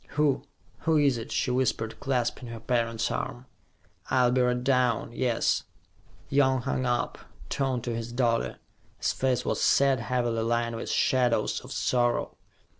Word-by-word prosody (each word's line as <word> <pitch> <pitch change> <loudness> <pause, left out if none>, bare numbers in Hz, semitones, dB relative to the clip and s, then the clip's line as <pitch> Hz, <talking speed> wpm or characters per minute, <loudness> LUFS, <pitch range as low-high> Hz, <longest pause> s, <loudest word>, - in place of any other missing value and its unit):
"Who 145 -3 +3 0.4
who 160 -1 +2
is 140 -5 +3
it?" 115 - -8
she 125 - 0
whispered, 125 -3 -1
clasping 125 -2 -1
her 115 -1 -7
parent's 115 -1 0
arm. 120 +1 -4 0.6
"I'll 125 -2 +3
be 130 0 +2
right 125 0 +1
down, 125 -4 +1
yes." 120 -2 +1 0.6
Young 130 -2 +2
hung 130 -1 -1
up, 120 0 -1 0.3
turned 130 -4 -1
to 120 -2 -2
his 115 +1 -5
daughter. 120 -2 0 0.4
His - - 0
face 130 -2 0
was - - -1
sad, 135 -2 +4
heavily 120 -1 -1
lined 115 0 0
with 115 - -5
shadows 125 -2 +2
of - - -12
sorrow. 120 -1 0
125 Hz, 150 wpm, -27 LUFS, 115-130 Hz, 0.6 s, sad